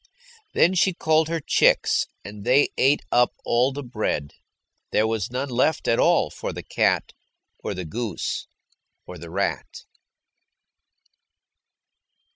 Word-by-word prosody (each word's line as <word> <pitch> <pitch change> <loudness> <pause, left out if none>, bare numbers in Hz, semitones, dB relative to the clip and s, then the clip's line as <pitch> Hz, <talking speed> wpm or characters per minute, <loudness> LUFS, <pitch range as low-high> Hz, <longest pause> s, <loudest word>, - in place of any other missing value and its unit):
Then 175 - +4
she 190 +1 +2
called 160 -1 +2
her 165 0 -1
chicks, 145 - +2 0.2
and 100 +1 -9
they 130 +5 +4
ate 140 +3 +3
up 120 0 +3
all 125 +3 +2
the 145 +1 -6
bread. 110 - -3 0.6
There 110 - +2
was 110 -3 -2
none 130 +3 -3
left 130 +6 +1
at 115 - +2
all - - +3
for - - -5
the - - -7
cat, - - 0 0.5
or - - -4
the 90 -1 -5
goose, 110 +3 -4 0.6
or - - -10
the 85 +1 -9
rat. 100 +4 -3
120 Hz, 130 wpm, -24 LUFS, 105-145 Hz, 0.6 s, Then